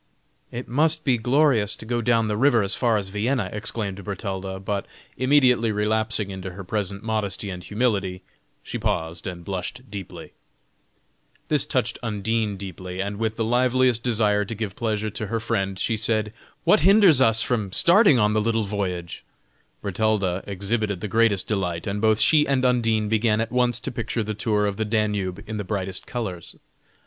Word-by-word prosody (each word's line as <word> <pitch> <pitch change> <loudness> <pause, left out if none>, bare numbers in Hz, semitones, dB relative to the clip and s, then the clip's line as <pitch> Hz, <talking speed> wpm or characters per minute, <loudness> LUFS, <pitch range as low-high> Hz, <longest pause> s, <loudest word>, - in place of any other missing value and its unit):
"It 120 +1 -6
must 155 +5 +2
be 125 -4 +2
glorious 125 -4 +2
to - - -11
go 120 +1 -1
down 115 -1 +2
the 105 - -1
river 120 -1 +3
as 100 - +5
far 115 -3 +2
as 100 -2 -4
Vienna!" 105 +1 -1
exclaimed 105 -2 -3
Bertalda, 95 -2 -5
but 100 +1 -3 0.3
immediately 130 -3 +3
relapsing 105 0 0
into 95 -1 -6
her 100 +2 -8
present 100 +1 -3
modesty 105 -3 -2
and 90 -1 -7
humility, 100 -5 -1 0.4
she - - -5
paused 80 +2 -2
and 85 -2 -7
blushed 100 +7 -5
deeply. 100 -3 -8 1.2
This - - +2
touched - - -1
Undine 110 -1 -1
deeply, 95 -1 -7
and 100 +1 -3
with 110 -1 -1
the 115 - -1
liveliest 125 0 +2
desire 105 -4 +2
to 110 +2 -6
give 105 -3 -4
pleasure 110 -2 -2
to 110 +1 -4
her 115 +2 -2
friend, 100 -4 -2
she 115 - 0
said: 110 -1 0 0.3
"What - - +5
hinders 190 -5 +6
us 115 -2 +5
from 110 -6 -1
starting 175 - +5
on 105 -2 +2
the 110 - +2
little 115 0 0
voyage?" 95 -4 -4 0.6
Bertalda 100 -2 0
exhibited 100 0 -2
the - - -3
greatest 110 -1 +2
delight, 90 -5 -2
and 100 +1 -3
both 110 -1 +3
she 150 +6 +4
and 130 -2 +1
Undine 115 -4 +2
began 110 0 +2
at 115 +1 -2
once 125 -1 +1
to - - -4
picture 115 -1 -3
the 110 +1 -3
tour 105 -1 0
of 100 -1 -2
the 110 - 0 0.2
Danube 100 -4 -2
in 110 0 -4
the 105 - -3
brightest 95 -1 -4
colors. 95 -9 -5
110 Hz, 175 wpm, -24 LUFS, 100-115 Hz, 1.2 s, hinders